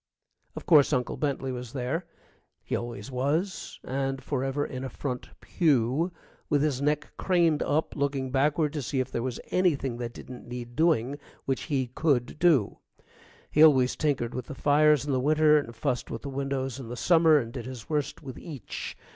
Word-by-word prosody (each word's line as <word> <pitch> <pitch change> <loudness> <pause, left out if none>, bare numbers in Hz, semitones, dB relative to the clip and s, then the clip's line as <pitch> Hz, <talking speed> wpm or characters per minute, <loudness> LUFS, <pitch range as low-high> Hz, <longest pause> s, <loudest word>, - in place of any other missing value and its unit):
Of - - -7
course, 150 -4 +6
Uncle 125 -3 0
Bentley 135 -3 -2
was 125 -2 -6
there 140 +7 -2 0.6
he - - -2
always 120 +3 -5
was, 150 +9 -2
and 135 0 -2
forever 135 +1 -1
in 130 -1 -6
a 135 - -4
front 125 0 -5
pew, 150 +1 +1 0.4
with 145 -1 +3
his 140 -4 0
neck 150 +1 0
craned 170 -5 +2
up 155 +2 0
looking 140 -2 -1
backward 145 +3 +2
to 150 - -2
see 135 +1 -2
if 130 0 -2
there 120 - -2
was 125 -1 -3
anything 145 -9 +1
that 120 -1 -5
didn't 125 -1 -10
need 120 0 -7
doing 145 -4 +2 0.3
which 135 -1 -1
he 135 -3 +1
could 130 +1 0
do. 160 - +3 0.7
He 150 - +3
always 130 -5 +5
tinkered 130 -6 0
with 125 -1 -5
the 145 - -7
fires 150 0 +4
in 145 - -2
the 130 - +2
winter 150 +2 +4
and 120 -5 -7
fussed 130 -5 -2
with 115 - -6
the 140 - -4
windows 135 -1 -3
in 130 - -7
the 120 - -6
summer, 165 -1 +5
and 115 -4 -2
did 125 -3 -6
his 125 -5 -8
worst 150 0 -2
with 130 -3 -8
each. 140 - -7
135 Hz, 185 wpm, -28 LUFS, 125-150 Hz, 0.7 s, course